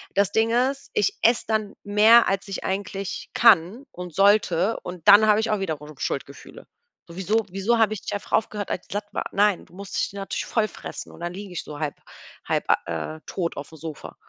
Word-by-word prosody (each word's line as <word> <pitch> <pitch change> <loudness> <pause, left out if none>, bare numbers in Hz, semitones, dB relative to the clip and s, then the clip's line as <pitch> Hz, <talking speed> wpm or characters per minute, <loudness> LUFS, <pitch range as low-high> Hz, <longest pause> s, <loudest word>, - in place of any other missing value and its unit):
Das 200 0 +2
Ding 225 +1 +2
ist, 260 +4 0
ich 420 -1 +1
esse 235 +1 +4
dann 215 -2 -1
mehr 215 +3 +6
als 195 +1 -1
ich 195 - -5
eigentlich 195 0 -4
kann 220 +2 +4
und 180 -3 -9
sollte, 200 -1 +3
und 180 -2 -8
dann 210 +2 +8
habe 210 +1 +4
ich 225 - -1
auch 210 - +1
wiederum 150 -5 -5
Schuldgefühle. 140 +1 -6 0.4
So 170 - -11
wieso 215 +3 +1
wieso 200 +5 +1
habe 215 -1 +3
ich 205 - -5
nicht - - -5
einfach 205 - -6
aufgehört 210 -2 -1
als 180 - -3
ich - - -7
satt 205 0 -3
war? - - -3
Nein, 205 -1 +2
du - - -23
musst 200 0 -7
dich - - -1
natürlich 195 -1 -4
voll 215 -2 0
fressen - - -8
und - - -14
dann 175 +1 -4
liege 200 0 -8
ich 180 - -5
so 150 -1 -8
halb 150 -2 -2 0.5
halb, - - 0 0.2
äh, 85 - -4
tot 170 -3 -3
auf 140 - -6
dem 160 - -13
Sofa. 155 -2 -8
200 Hz, 215 wpm, -24 LUFS, 175-215 Hz, 0.5 s, dann